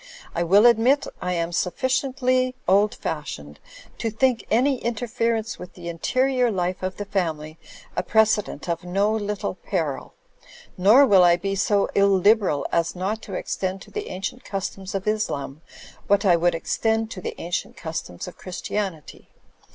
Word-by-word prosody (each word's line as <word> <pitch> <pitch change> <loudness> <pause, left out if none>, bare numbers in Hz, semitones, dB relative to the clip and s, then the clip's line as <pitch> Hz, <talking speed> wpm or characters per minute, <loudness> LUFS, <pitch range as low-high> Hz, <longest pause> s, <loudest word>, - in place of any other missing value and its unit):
I 170 - -1
will 195 +6 +5
admit 240 +4 +4 0.2
I 180 - -1
am 170 -1 -1
sufficiently 255 +6 0
old 200 +3 +4
fashioned 75 - -6 0.4
to 225 - -1
think 235 +2 +1
any 255 +3 +2
interfer 230 0 -1
ence 225 +2 -5
with 180 - -10
the 170 -1 -7
interior 255 +8 +1
life 185 -3 -2
of 185 0 -3
the 205 - -4
family 160 -6 -3 0.4
a - - +1
precedent 215 -7 +1
of 170 0 -2
no 195 +4 +1
little 210 -2 -2
peril. 165 -7 -3 0.6
Nor 215 +10 +6
will 195 -7 +6
I 175 -1 +6
be 195 +3 -3
so 200 +1 +2
illiberal 200 -4 +3
as 170 +1 0
not 200 +5 -2
to 195 - -7
extend 190 +1 -3
to - - -17
the - - -5
ancient 195 +7 -5
customs 195 -1 -5
of 195 +1 -3
Islam 155 -9 -2 0.5
what 200 +1 +3
I 180 -3 +6
would 175 0 +2
extend 225 +6 0
to 185 - -7
the - - -6
ancient 175 +2 -4
customs 160 - -6
of - - -11
Christianity. 185 -3 -5
195 Hz, 160 wpm, -24 LUFS, 175-225 Hz, 0.6 s, Nor